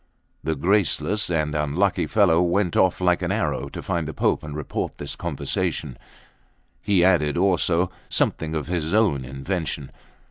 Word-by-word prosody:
The 80 - -1
graceless 100 +5 +1
and 75 -3 0
unlucky 75 +6 0
fellow 90 -6 +4
went 90 +1 +1
off 95 -1 +3
like 90 -1 +2
an - - -1
arrow - - -1
to - - -8
find 85 -3 -2
the 80 - -6
Pope - - +1
and 75 -1 -7
report 75 - -4
this - - -5
conversation; 60 - -3 0.9
he 95 -4 +3
added 80 -5 +3
also 90 -1 +2 0.2
something 80 0 0
of 75 -3 -2
his 85 +2 -1
own 100 -12 +2
invention. 70 +2 -4
85 Hz, 150 wpm, -23 LUFS, 75-95 Hz, 0.9 s, fellow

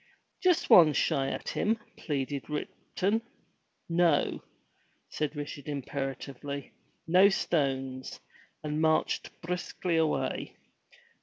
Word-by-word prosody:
"Just 360 -3 +3
one 160 -4 +8
shy 135 -1 +1
at - - -4
him," 220 +2 +1 0.2
pleaded 140 -2 -3
Ripton. 195 +7 -2 0.7
"No," 170 -3 +2 0.7
said 155 0 -2
Richard 145 0 -6
imperatively, 140 0 -5 0.3
"no 185 +4 +6
stones," 135 -8 -1 0.4
and 150 0 -1
marched 160 0 +2
briskly 175 0 -2
away. 160 -2 0
150 Hz, 90 wpm, -30 LUFS, 140-175 Hz, 0.7 s, one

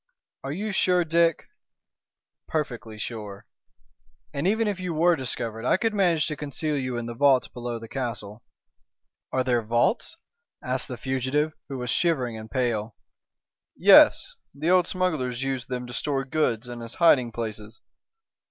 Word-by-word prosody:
"Are 135 - -4
you 205 +8 -3
sure, 180 -2 +2
Dick?" 165 0 +2 1.0
"Perfectly 120 -8 -3
sure. 105 -3 -7 0.9
And 140 +5 -1
even 220 +2 +2
if 200 -3 -2
you 180 -3 -3
were 170 +2 +4
discovered 115 -5 -4
I 125 - +3
could 225 +1 0
manage 175 -6 +2
to 155 - -3
conceal 150 +1 -3
you 130 -3 -2
in 120 - -3
the 120 - -5
vaults 135 +1 +4
below 120 -1 -5
the 115 0 -9
castle." 115 -4 -5 0.9
"Are 130 - +1
there 125 -2 +1
vaults?" 120 - 0 0.5
asked 130 -1 -2
the 125 - -6
fugitive, 130 +5 -1 0.2
who 135 - -4
was 125 -2 -3
shivering 135 -9 +1
and 110 0 -9
pale. 115 -2 -1 0.8
"Yes! - - +6 0.2
The 155 +5 0
old 180 -1 +4
smugglers 140 -9 -1
used 130 -3 -3
them 125 -1 -3
to 120 - -9
store 135 +2 -1
goods 130 -5 0
and 120 -1 -7
as 115 +1 -8
hiding 130 -8 +4
places. 110 -1 -6
130 Hz, 155 wpm, -26 LUFS, 120-160 Hz, 1.0 s, Yes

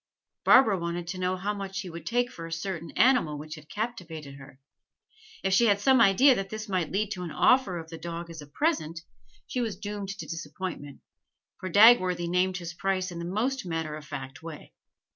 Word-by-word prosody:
Barbara 215 -8 +6
wanted 170 0 -3
to 185 0 -4
know 185 0 0
how 200 +3 -2
much 195 -1 -5
he 185 - -7
would 170 +1 -9
take 245 +1 +1
for 165 0 -8
a - - -11
certain 165 0 -4
animal 235 - +4
which 155 +1 -8
had 155 -1 -12
captivated 175 - -5
her; 135 -1 -14 0.8
if 190 0 +1
she 235 +5 +5
had 205 -1 +3
some 260 +3 +4
idea 240 +7 +6
that 195 -5 -3
this 215 +1 -6
might 185 -5 -1
lead 210 +2 -1
to 180 - -4
an 175 - -4
offer 225 0 +3
of 165 0 -8
the 165 - -7
dog 170 +1 -6
as 165 -2 -8
a 145 - -11
present, 165 - -1 0.4
she 250 - -3
was 225 -5 -3
doomed 205 -1 -5
to 195 0 -6
disappointment, 160 -2 -6 0.6
for 185 - -5
Dagworthy 185 -4 +6
named 180 +1 +1
his 170 -1 -6
price 185 +1 -1
in 170 - -6
the 170 - -4
most 240 +9 -1
matter 165 -3 -3
of 155 - -9
fact 135 -2 -8
way. 160 -2 -10
185 Hz, 205 wpm, -28 LUFS, 165-205 Hz, 0.8 s, Barbara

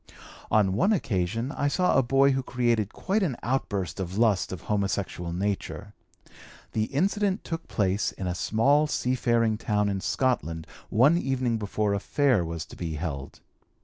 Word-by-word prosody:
"On 100 -3 +3
one 130 - +2
occasion 115 - -1
I 145 - -1
saw 180 +5 +2
a 135 - +6
boy 135 +2 +4
who 135 0 0
created 120 -4 0
quite 200 +3 -1
an 150 -11 0
outburst 100 -8 -2
of 95 +1 -4
lust 110 -4 +2
of 95 -3 -6
homosexual 100 -4 -2
nature. 100 +2 -3 0.8
The 110 -1 0
incident 195 - 0
took 165 -1 -5
place 100 -1 0
in 95 - -6
a 90 - -1
small 140 +11 +2
seafaring 120 -5 +1
town 105 -2 +1
in 95 -1 -2
Scotland 85 - -1 0.2
one 140 +10 +4
evening 130 -6 0
before 105 0 -1
a 100 - 0
Fair 130 -4 +2
was 80 -2 -5
to - - -13
be 80 -3 -4
held. 75 -4 -5
110 Hz, 160 wpm, -27 LUFS, 95-135 Hz, 0.8 s, a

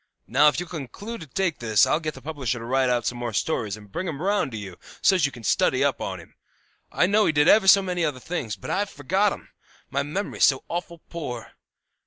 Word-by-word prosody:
Now, 140 +5 +4
if 150 - +3
you'll 175 - -5
conclude 180 - -7
to 160 - -9
take 180 +4 -1
this 110 +1 +4
I'll 135 +4 +1
get 155 -2 -4
the 130 - -12
publisher 135 -5 -3
to 115 - -7
write 130 +1 +2
out 120 -1 0
some 120 - -2
more 120 -2 -3
stories, 110 -4 -1
and 105 -2 -15
bring 185 - -3
'em 150 -5 -4
round 195 -5 0
to 110 - -5
you, 95 -4 -8 0.2
so's 185 -7 +4
you - - -7
can 120 -3 -12
study - - +2
up - - 0
on - - -4
him. - - -15 0.6
I - - +3
know 210 +3 +3
he - - +3
did 150 0 +3
ever 210 0 +6
so 195 +1 +8
many 180 -2 -1
other 145 -5 -1
things, 130 -8 -4
but - - -7
I've 205 0 0
forgot 190 +8 +1
'em; - - -8 0.4
my 140 +1 0
memory's 155 +9 0
so 135 -2 +2
awful 170 -1 -5
poor. 125 -10 -6
150 Hz, 240 wpm, -25 LUFS, 125-180 Hz, 0.6 s, so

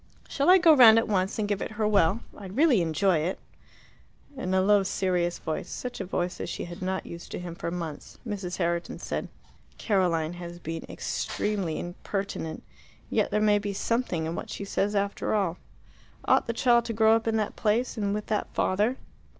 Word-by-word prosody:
"Shall 280 +5 +1
I 370 - +9
go 335 -4 +6
round 230 -5 +9
at 225 - +2
once 190 -2 0
and 215 -2 0
give 205 -1 -1
it - - -4
her 215 0 0
well? 205 +1 +3
I'd 195 -1 -9
really 285 - +5
enjoy 170 +2 +2
it." 170 +5 -2 1.0
In 185 -9 -3
a - - +4
low, 200 +2 +4
serious 180 -2 0
voice 160 -1 -4
such 250 -1 -5
a - - -3
voice 180 -1 -2
as - - -4
she - - -4
had 175 +1 -9
not 190 +1 -2
used 170 0 -9
to - - -3
him 175 -1 -6
for 170 - -4
months 170 -4 -6
Mrs. 195 -5 -4
Herriton 170 -1 -1
said, - - -4 0.5
"Caroline 175 -6 +1
has 175 -1 -8
been 165 -1 -6
extremely 195 -7 -2
impertinent. 175 -2 -4 0.5
Yet - - +2
there 210 - +1
may 210 -1 +4
be 205 -1 -3
something 195 -6 -1
in 160 - -3
what - - -6
she 200 - -5
says 205 +1 -1
after 200 +1 0
all. 185 -4 0 0.7
Ought - - +3
the - - +1
child 235 0 +3
to 230 - -3
grow 220 0 +5
up 225 0 -1
in 225 0 +2
that 215 -1 -2
place 225 +4 0
and 205 -3 -1
with 210 +1 -2
that 210 -1 -2
father?" 210 +7 +1
200 Hz, 200 wpm, -27 LUFS, 175-220 Hz, 1.0 s, I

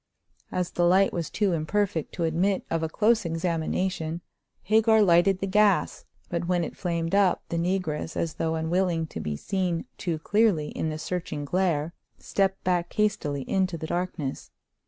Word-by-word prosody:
As 180 -1 -1
the 175 - 0
light 190 +3 +4
was 170 -3 -2
too 205 -4 +1
imperfect 165 +1 -1
to 170 - -2
admit 180 +4 +1
of 165 0 0
a 160 - -1
close 225 +6 +2
examination, 165 0 -2 0.4
Hagar 220 +2 +4
lighted 180 +1 +4
the - - 0
gas, 205 0 +2 0.2
but 170 0 -3
when 175 -1 +1
it - - -5
flamed 170 -2 -2
up 200 -2 +3
the 170 - -2
negress, 170 -3 -2
as 165 -2 -1
though 160 0 -1
unwilling 165 +1 0
to - - -7
be 75 - -3
seen 180 - -2
too 170 -5 -1
clearly 185 -3 +2
in 160 - -3
the 155 - -4
searching 155 -2 -4
glare, 170 -1 0 0.2
stepped 195 -1 -1
back 175 -1 0
hastily 150 -10 0
into 185 -3 0
the 160 - -5
darkness. 165 -5 -3
175 Hz, 165 wpm, -26 LUFS, 160-190 Hz, 0.4 s, light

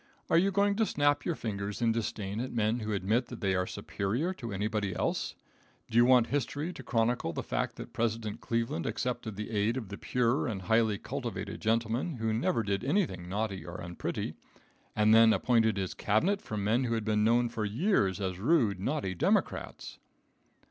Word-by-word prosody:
Are - - +6
you 195 +3 +3
going 200 +1 +2
to 225 - +3
snap 145 0 +2
your 170 - 0
fingers 100 -4 -4
in 115 -1 +3
disdain 105 -2 -3
at 130 +2 -3
men 115 +1 +1
who 110 -1 -3
admit 105 +5 +1
that - - -8
they 95 -2 +1
are 90 0 0
superior 120 - -2
to 120 - -7
anybody 105 -1 -1
else? - - -1 0.6
Do - - -5
you 120 +1 +7
want 125 -2 +6
history 145 +6 -2
to 165 - -9
chronicle 115 -6 0
the - - -3
fact - - -2
that - - -9
President 115 -2 -2
Cleveland 115 -7 -1
accepted 120 -4 -3
the 105 +3 -5
aid 110 +3 +1
of 115 -6 -5
the 100 - -7
pure 125 +3 +1
and 100 -5 -4
highly 110 +1 +2
cultivated 110 -5 -5
gentlemen 115 +7 0
who 110 -2 -1
never 115 0 +1
did 100 +1 -1
anything 130 - 0
naughty 100 -2 -2
or 85 +1 -7
unpretty, 85 0 -4 0.6
and 110 0 +4
then 115 0 +7
appointed 115 -3 +2
his 95 -2 -2
Cabinet 180 - +1
from 105 -2 -4
men 115 +5 +2
who 115 -1 0
had 110 -2 -2
been 105 -1 +2
known 120 +2 +4
for 115 -2 -4
years 105 - +1
as 95 -2 -3
rude, 115 - +2
naughty 120 -2 -1
Democrats? 85 - -1
110 Hz, 190 wpm, -30 LUFS, 100-125 Hz, 0.6 s, you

